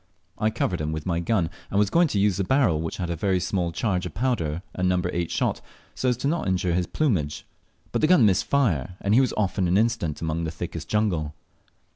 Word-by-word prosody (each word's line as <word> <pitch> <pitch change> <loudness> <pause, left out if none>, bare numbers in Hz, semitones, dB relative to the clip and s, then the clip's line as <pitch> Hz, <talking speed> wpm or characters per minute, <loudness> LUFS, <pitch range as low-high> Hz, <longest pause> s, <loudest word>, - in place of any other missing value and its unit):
I 110 - +2
covered 95 -6 -1
him 75 0 -2
with 80 -1 -4
my 85 -2 0
gun, 85 -2 0 0.2
and 100 - -1
was 105 0 +3
going 170 +4 +4
to 110 - -2
use 100 -2 +2
the 95 - 0
barrel 100 - +2
which 80 - -4
had 90 -2 -3
a - - -1
very 95 +2 +1
small 90 -1 -1
charge 90 0 -1
of 80 - -11
powder 95 -10 -1
and 90 0 0
number 90 -1 0
eight 85 -1 -1
shot, - - -1 0.3
so 130 - 0
as 125 +2 -1
not 160 +4 0
to - - 0
injure 90 -1 0
his 90 0 0
plumage, 85 - -1 0.5
but - - -1
the 155 - +4
gun 165 -9 +6
missed 95 -3 +3
fire, 90 - +1
and 100 - +1
he 125 - +6
was 130 - +1
off 100 -3 -1
in 90 - +2
an 90 +2 +3
instant 95 -9 0
among 80 +1 -2
the 80 - -2
thickest 85 0 -6
jungle. 85 -8 0
90 Hz, 240 wpm, -25 LUFS, 85-110 Hz, 0.5 s, gun